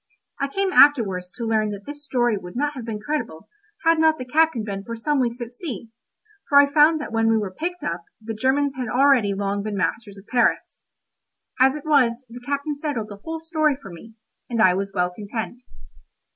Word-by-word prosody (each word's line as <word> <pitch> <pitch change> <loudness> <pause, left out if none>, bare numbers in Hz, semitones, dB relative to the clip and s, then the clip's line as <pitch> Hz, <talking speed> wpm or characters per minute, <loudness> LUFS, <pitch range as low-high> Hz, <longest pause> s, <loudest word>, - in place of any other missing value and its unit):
I 275 - 0
came 385 +6 -1
afterwards 205 -11 +5
to 235 - -4
learn 220 -1 +1
that 200 -1 -7
this 290 0 -8
story 240 -5 +1
would 180 -3 -8
not 295 +3 0
have 255 -5 -7
been 220 -2 -4
credible, 230 - -4 0.4
had 330 0 +4
not 315 0 +4
the 255 - -6
captain 300 -2 +2
been 200 -2 -5
for 230 +2 -6
some 285 +5 0
weeks 240 -1 -1
at 240 0 -7
sea, 235 - -6 0.6
for 280 - +5
I 285 0 +4
found 310 +1 +5
that 295 - -6
when 225 0 +2
we 225 - +3
were 200 -4 -3
picked 355 - -4
up, 170 0 -4
the 225 0 -6
Germans 265 +5 +1
had 255 -1 -4
already 245 -4 +3
long 200 0 -2
been 205 0 -4
masters 200 +1 -2
of 195 - -14
Paris. 240 0 0 0.7
As 265 +2 +5
it 300 - -8
was, 260 -5 +2
the 245 +1 -10
captain 285 +3 -2
settled 280 -8 -3
the 205 - -9
whole 325 0 -4
story 315 -3 +1
for 195 -9 -11
me, 220 +7 -13 0.3
and 235 -2 -2
I 185 -4 +6
was 195 +1 -2
well 180 -2 0
content. 220 +5 -6
240 Hz, 210 wpm, -23 LUFS, 210-290 Hz, 0.7 s, I